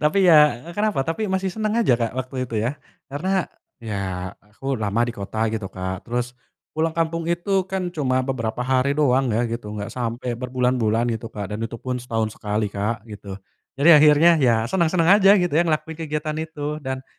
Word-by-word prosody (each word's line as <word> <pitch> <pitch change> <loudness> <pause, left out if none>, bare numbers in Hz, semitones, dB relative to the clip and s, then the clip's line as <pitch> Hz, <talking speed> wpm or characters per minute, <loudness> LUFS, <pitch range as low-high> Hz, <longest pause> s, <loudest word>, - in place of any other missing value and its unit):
tapi 185 +6 +3
ya 150 -2 +5
kenapa 205 -8 0
tapi 190 +6 -2
masih 190 -1 -1
seneng 215 0 -1
aja - - +4
Kak 115 +1 -2
waktu 130 -1 -3
itu 115 - -4
ya, 140 +4 -3 0.3
karena 185 +4 0 0.3
ya 95 -5 -4
aku 110 +7 -6
lama 105 +3 +1
di 120 - -4
kota 110 +1 -3
gitu 105 -4 -3
Kak 95 +3 -6
terus, 125 +1 -2 0.4
pulang 160 +1 -1
kampung 165 0 -1
itu 190 +2 0
kan 185 -2 -3
cuma 130 -4 0
beberapa 125 -2 -2
hari 130 +2 +1
doang 135 -3 +3
ya 120 - +1
gitu 115 -3 -5
nggak 105 +3 -5
sampe 120 0 -3
berbulan-bulan 125 -2 0
gitu 115 0 -5
Kak 105 -1 -6
dan 105 - -4
itu 115 +1 -4
pun 125 +1 -4
setahun 115 -3 -2
sekali 105 -1 -2
Kak 105 +2 -2
gitu, 100 -3 -9 0.4
jadi 150 +2 +7
akhirnya 150 +3 +6
ya 120 -4 +4
senang-senang 175 - +3
aja 195 +2 +7
gitu 175 -4 0
ya 160 - +4
ngelakuin 160 -1 -1
kegiatan 155 -1 -3
itu 150 -1 -5
dan, 130 -1 -5
130 Hz, 185 wpm, -22 LUFS, 115-160 Hz, 0.4 s, jadi